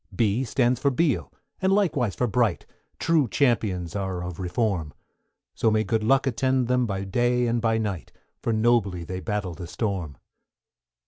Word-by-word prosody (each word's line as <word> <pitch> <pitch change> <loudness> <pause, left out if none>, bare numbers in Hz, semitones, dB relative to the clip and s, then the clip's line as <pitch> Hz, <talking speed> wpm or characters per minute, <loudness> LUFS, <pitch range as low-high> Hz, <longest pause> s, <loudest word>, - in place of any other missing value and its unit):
=B= 115 +2 +1
stands 125 0 +1
for 140 - +2
Beale, 145 +3 0 0.3
and 190 0 +2
likewise 155 - +1
for 125 - +1
Bright, 115 -4 +1 0.3
True 160 -5 +2
Champions 105 - 0
are 95 -3 -3
of 90 0 -6
Reform; 90 -4 -1 0.6
So 115 - +2
may 110 0 +2
good 110 +2 0
luck 135 +5 +3
attend 130 0 +1
them 125 -1 +2
by 95 -2 -3
day 120 +5 +1
and 120 0 0
by 115 -1 +2
night, 100 - -3 0.3
For - - -1
nobly 110 -5 +2
they 90 +2 -5
battle 100 -3 -3
the 85 0 -8
storm. 90 -7 -3
110 Hz, 160 wpm, -25 LUFS, 95-125 Hz, 0.6 s, luck